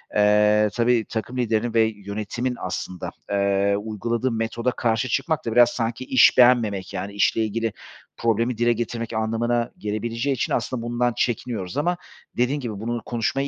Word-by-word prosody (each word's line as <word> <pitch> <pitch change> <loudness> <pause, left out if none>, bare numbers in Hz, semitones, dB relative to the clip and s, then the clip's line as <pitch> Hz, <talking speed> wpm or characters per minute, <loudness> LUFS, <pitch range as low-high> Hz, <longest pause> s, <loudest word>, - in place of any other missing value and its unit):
eee, 105 0 +4
tabii, 120 -1 +2
takım 120 +3 -4
liderinin 115 -1 0
ve 115 - +4
yönetimin 105 +5 -4
aslında, 90 0 -4 0.2
eee, 100 0 +2
uyguladığı 115 +4 -2
metoda 115 +2 -1
karşı 120 +2 0
çıkmak 160 -1 -1
da 115 - -1
biraz 120 +1 +6
sanki 115 +1 -3
iş 130 -2 +5
beğenmemek, 110 -7 +4
yani, 95 +2 -4
işle 100 +2 +2
ilgili 115 0 -2 0.4
problemi 115 +1 0
dile 120 +1 +3
getirmek 115 0 -4
anlamına 115 +2 0
gelebileceği 115 +6 -2
için - - -1
aslında 125 -3 -1
bundan 120 +1 0
çekiniyoruz 115 -3 -2
ama 175 +4 +1 0.4
dediğin 125 +4 +1
gibi 115 -7 -5
bunu 120 +2 -3
konuşmayı 125 +4 -1
115 Hz, 150 wpm, -23 LUFS, 105-120 Hz, 0.4 s, biraz